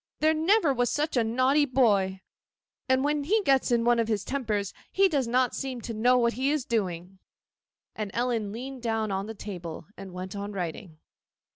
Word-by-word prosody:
There 310 Hz, +1 st, +4 dB
never 325 Hz, 0 st, +3 dB
was 245 Hz, -1 st, +1 dB
such 300 Hz, 0 st, -1 dB
a 240 Hz, -, +3 dB
naughty 255 Hz, +6 st, +3 dB
boy! 200 Hz, -8 st, +2 dB, 0.7 s
When 285 Hz, +3 st, +2 dB
he 420 Hz, +8 st, +2 dB
gets 270 Hz, -6 st, +3 dB
one 240 Hz, 0 st, +3 dB
of 230 Hz, -, +1 dB
his 215 Hz, -3 st, -1 dB
tempers 220 Hz, -8 st, -2 dB, 0.2 s
he 390 Hz, 0 st, +4 dB
does 280 Hz, -8 st, 0 dB
not 250 Hz, +1 st, +2 dB
seem 265 Hz, -3 st, -4 dB
to 230 Hz, -, -5 dB
know 245 Hz, +4 st, +3 dB
what 235 Hz, -1 st, +2 dB
he 265 Hz, +2 st, 0 dB
is 295 Hz, -3 st, 0 dB
doing.' 190 Hz, -4 st, -2 dB, 0.8 s
And 215 Hz, -2 st, -3 dB
Ellen 235 Hz, -4 st, 0 dB
leaned 255 Hz, +3 st, -7 dB
down 225 Hz, -2 st, -1 dB
on 195 Hz, +1 st, -2 dB
the 225 Hz, -, -7 dB
table, 180 Hz, -6 st, -7 dB
and 195 Hz, -1 st, -9 dB
went 185 Hz, +2 st, -6 dB
on 200 Hz, +1 st, -5 dB
writing. 175 Hz, -2 st, -5 dB
235 Hz, 180 wpm, -27 LUFS, 200-270 Hz, 0.8 s, There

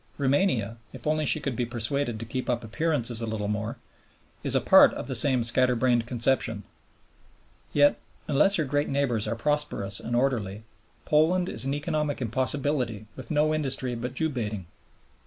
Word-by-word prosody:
Roumania, 135 Hz, -, +1 dB, 0.2 s
if 130 Hz, -2 st, -10 dB
only 155 Hz, 0 st, +1 dB
she -, -, +2 dB
could 140 Hz, -4 st, -3 dB
be 120 Hz, -, -1 dB
persuaded 120 Hz, +1 st, -2 dB
to 115 Hz, -, -6 dB
keep 130 Hz, +3 st, -4 dB
up 120 Hz, -1 st, 0 dB
appearances 120 Hz, -1 st, 0 dB
a 115 Hz, -, -3 dB
little 110 Hz, -2 st, -3 dB
more, 105 Hz, +2 st, -3 dB, 0.7 s
is -, -, 0 dB
a -, -, +5 dB
part -, -, +6 dB
of -, -, -5 dB
the -, -, -4 dB
same 130 Hz, -4 st, +3 dB
scatter 125 Hz, +2 st, +2 dB
brained 120 Hz, -1 st, +1 dB
conception. 120 Hz, -3 st, +1 dB, 1.1 s
Yet, 145 Hz, 0 st, +4 dB, 0.3 s
unless 155 Hz, +8 st, +3 dB
her 155 Hz, -, +1 dB
great 145 Hz, +2 st, -1 dB
neighbors 130 Hz, -6 st, 0 dB
are 115 Hz, -, -1 dB
prosperous 115 Hz, -7 st, -1 dB
and 120 Hz, -, -3 dB
orderly, 110 Hz, -6 st, -1 dB, 0.4 s
Poland 170 Hz, +4 st, +3 dB
is -, -, 0 dB
an 135 Hz, +1 st, -1 dB
economic 145 Hz, 0 st, -2 dB
impossibility 130 Hz, -2 st, -1 dB
with 130 Hz, -3 st, -10 dB
no 155 Hz, +1 st, +2 dB
industry 135 Hz, -4 st, -1 dB
but 120 Hz, +2 st, -5 dB
Jew 160 Hz, +3 st, 0 dB
baiting. 105 Hz, -, -4 dB
130 Hz, 170 wpm, -26 LUFS, 115-145 Hz, 1.1 s, part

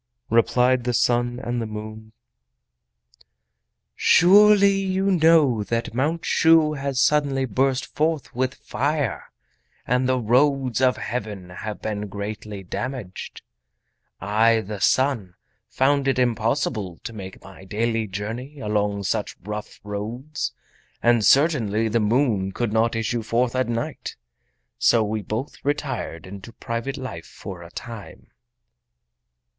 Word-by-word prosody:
Replied 125 Hz, +2 st, +3 dB
the 125 Hz, -, 0 dB
Sun 120 Hz, +1 st, +1 dB
and 120 Hz, 0 st, -2 dB
the 115 Hz, -, -3 dB
Moon: 110 Hz, +1 st, -8 dB, 1.8 s
"Surely 200 Hz, +2 st, +6 dB
you 195 Hz, 0 st, 0 dB
know 160 Hz, -, +4 dB
that 115 Hz, 0 st, -2 dB
Mount 150 Hz, +7 st, -1 dB
Shu 160 Hz, -1 st, +4 dB
has 140 Hz, -2 st, -2 dB
suddenly 140 Hz, -1 st, +2 dB
burst 130 Hz, +3 st, 0 dB
forth 155 Hz, -1 st, -1 dB
with 130 Hz, +2 st, -1 dB
fire, 140 Hz, 0 st, -2 dB, 0.5 s
and 125 Hz, +1 st, +1 dB
the 130 Hz, -, +2 dB
roads 130 Hz, +2 st, +2 dB
of 130 Hz, -1 st, +3 dB
Heaven 105 Hz, -6 st, -5 dB
have 105 Hz, +4 st, -7 dB
been 105 Hz, -1 st, -3 dB
greatly 100 Hz, 0 st, -6 dB
damaged! 100 Hz, +2 st, -6 dB, 0.8 s
I, 110 Hz, +2 st, +3 dB
the 105 Hz, 0 st, -6 dB
Sun, 120 Hz, -10 st, +1 dB, 0.3 s
found 140 Hz, +1 st, +2 dB
it 135 Hz, -, +2 dB
impossible 115 Hz, -, 0 dB
to 115 Hz, -, -6 dB
make 95 Hz, -3 st, -9 dB
my 95 Hz, -1 st, -13 dB
daily 115 Hz, +3 st, -1 dB
journey 115 Hz, +9 st, -6 dB
along 105 Hz, -2 st, -1 dB
such 105 Hz, +1 st, -2 dB
rough 105 Hz, +1 st, -6 dB
roads—and 120 Hz, +1 st, -3 dB
certainly 115 Hz, -7 st, +3 dB
the 115 Hz, +2 st, +1 dB
Moon 105 Hz, -4 st, +1 dB
could 120 Hz, -3 st, -2 dB
not 115 Hz, +1 st, +2 dB
issue 115 Hz, +1 st, -1 dB
forth 120 Hz, +3 st, 0 dB
at 130 Hz, -2 st, 0 dB
night! 115 Hz, 0 st, -4 dB, 0.6 s
so 115 Hz, -2 st, +4 dB
we 110 Hz, 0 st, -2 dB
both 110 Hz, +7 st, -5 dB
retired 140 Hz, -, -3 dB
into 100 Hz, +4 st, -10 dB
private 115 Hz, +4 st, -4 dB
life 125 Hz, -12 st, -7 dB
for 90 Hz, -3 st, -9 dB
a 85 Hz, -, -11 dB
time." 115 Hz, +3 st, -10 dB
115 Hz, 125 wpm, -23 LUFS, 105-135 Hz, 1.8 s, Surely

